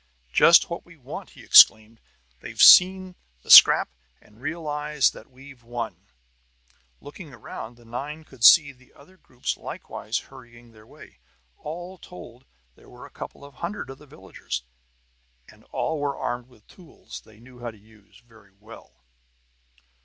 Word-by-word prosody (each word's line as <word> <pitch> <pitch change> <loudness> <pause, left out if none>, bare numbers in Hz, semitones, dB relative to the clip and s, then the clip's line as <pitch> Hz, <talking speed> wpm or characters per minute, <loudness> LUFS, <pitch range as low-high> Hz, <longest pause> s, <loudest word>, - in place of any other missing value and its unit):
"Just - - +5
what - - -7
we - - -19
want!" - - -10
he - - -17
exclaimed. 110 +1 +5 0.4
"They've - - -12
seen 185 0 +6 0.3
the - - -4
scrap, - - +8 0.3
and 105 +3 -24
realize 150 -2 -2
that 110 - -16
we've 135 0 -17
won!" 120 0 -8 0.9
Looking 145 -1 -13
around, 115 +2 -11
the 120 - -21
nine 145 +7 -8
could 130 -6 -15
see 145 +3 +7
the 130 -1 -26
other 150 +7 -20
groups 130 -8 -7
likewise 110 +4 -7
hurrying 120 -3 -14
their 110 -1 -20
way. - - -18 0.4
All 175 +4 -9
told, 130 -7 -14 0.3
there - - -22
were - - -14
a - - -16
couple 140 - -11
of 140 - -16
hundred 170 -1 -7
of 135 - -14
the 150 - -18
villagers, 135 - -9 0.8
and - - -21
all 160 -1 -4
were 145 -1 -4
armed 120 0 -5
with 120 -5 -25
tools 175 -4 -14
they 110 -1 -21
knew 125 +1 -18
how 120 -1 -6
to 110 - -15
use 105 +1 -23
very 110 -4 -23
well. 110 - -17
130 Hz, 155 wpm, -23 LUFS, 115-150 Hz, 0.9 s, scrap